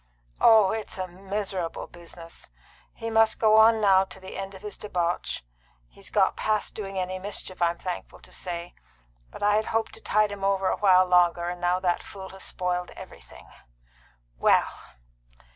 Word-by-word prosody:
"Oh, 215 -4 +6
it's 220 -2 -5
a 185 - -2
miserable 190 -1 -4
business! 170 - -12 0.4
He 230 0 -6
must 225 0 +4
go 215 -1 +4
on 220 0 +6
now 195 -2 +5
to 190 - -10
the 190 0 -10
end 195 0 -6
of 190 - -13
his 210 - -6
debauch. 175 - -2 0.5
He's - - -11
got - - +2
past 215 -1 -1
doing 195 -2 -6
any 185 0 -2
mischief, 190 -2 -5
I'm 170 0 +2
thankful 180 -1 -6
to - - -16
say. 175 -1 -6 0.6
But - - -9
I 205 0 +4
had 215 - -1
hoped 225 0 -1
to - - -12
tide 215 -1 +2
him 200 -1 -7
over 195 -1 +1
a - - -1
while 185 -2 +5
longer, 175 -1 +3
and 180 0 -6
now 175 +1 +1
that 175 -2 0
fool 190 -1 -9
has 190 0 -9
spoiled 180 -1 -2
everything. - - -13 0.9
Well!" - - +3
190 Hz, 175 wpm, -26 LUFS, 180-210 Hz, 0.9 s, Oh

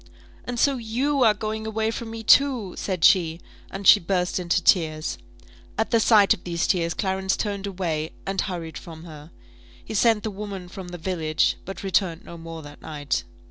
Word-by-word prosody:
"And 245 -1 -4
so 275 +2 +3
you 255 +5 -1
are 215 -3 +5
going 220 +1 -4
away 220 0 -1
from 230 0 -6
me, 225 0 -7
too?" 245 -5 +4
said 185 -4 -3
she; 170 -3 +4 0.3
and 195 +1 -7
she - - +9
burst 180 +1 -1
into 175 +1 +1
tears. 160 -4 +1 0.6
At - - 0
the 230 - +4
sight 210 -3 +5
of - - -10
these 170 -1 -1
tears 170 -3 0
Clarence 190 -1 -1
turned 200 -2 -3
away, 170 -5 -3
and 195 0 -1
hurried 170 -4 -5
from 160 -1 -11
her. 155 -2 -11 0.6
He - - -6
sent 220 0 +3
the 220 - -3
woman 195 -3 -7
from 185 0 -8
the 175 0 -7
village, 160 -3 0
but 195 +1 -7
returned 185 -3 0
no 170 - -9
more 165 -1 -8
that 145 0 -12
night. 145 -3 -3
190 Hz, 185 wpm, -24 LUFS, 165-215 Hz, 0.6 s, she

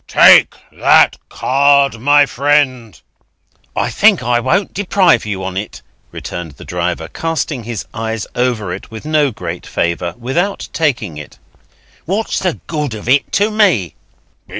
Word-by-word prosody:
"Take - - +6 0.2
that - - +4
card, 140 -2 +2
my 145 +4 +4
friend." 135 -5 0 0.8
"I - - -1
think - - +3
I 120 +1 +1
won't 170 - 0
deprive 185 - +2
you 95 -2 -4
on 95 0 -4
it," 105 +2 -6 0.3
returned 80 -4 -7
the - - -13
driver, 85 -2 -3
casting 160 - -3
his 115 -3 -5
eyes 115 -1 -4
over 120 -7 -1
it - - -9
with 110 +5 -10
no 155 -2 +2
great 90 -6 -7
favour, 85 0 -2
without 165 +12 -2
taking 120 - -1
it. 75 - -12 0.7
"What's 205 +5 -2
the 185 -4 -2
good 150 -7 -3
of 105 - -9
it 135 +3 +2
to 205 +2 +2
me?" 185 - +2
125 Hz, 145 wpm, -16 LUFS, 105-150 Hz, 0.8 s, Take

